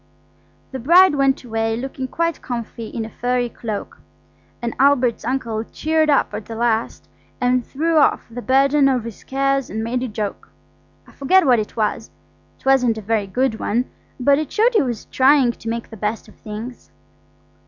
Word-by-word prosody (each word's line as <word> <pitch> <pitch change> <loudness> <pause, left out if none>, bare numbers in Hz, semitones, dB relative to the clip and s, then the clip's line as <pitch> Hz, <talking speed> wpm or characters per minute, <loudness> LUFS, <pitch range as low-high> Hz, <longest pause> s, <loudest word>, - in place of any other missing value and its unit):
The 265 - -5
bride 345 +7 +6
went 275 -2 +1
away 225 -1 -1
looking 260 +1 -5
quite 335 +4 -2
comfy 235 -2 -5
in 225 0 -5
a - - -8
furry 245 0 -1
cloak, 215 -3 -6 0.6
and 235 -1 -3
Albert's 260 -4 +3
uncle 230 -3 -2
cheered 315 +5 0
up 285 - +2
at - - -5
the 225 - -6
last 230 0 -1 0.3
and 250 0 +2
threw 320 +6 -1
off 295 - +3
the 235 +1 -7
burden 275 +2 +3
of 255 -4 0
his 230 -3 -9
cares 275 0 0
and 220 +1 -3
made 245 +2 -2
a 255 - -2
joke. 210 -2 -5 0.6
I - - -18
forget 365 +6 +3
what 250 -4 +4
it 210 - -5
was; 220 +1 -1 0.5
it - - -27
wasn't 250 -4 +3
a - - -5
very 210 -1 0
good 235 +2 -1
one, 240 +5 -1 0.3
but 280 +3 +3
it 310 - -4
showed 460 +3 +3
he 440 - +4
was 240 -5 -3
trying 265 -2 +4
to 225 - -8
make 235 0 -4
the 220 - -9
best 210 +2 -3
of - - -16
things. 225 +4 -8
245 Hz, 185 wpm, -20 LUFS, 225-275 Hz, 0.6 s, bride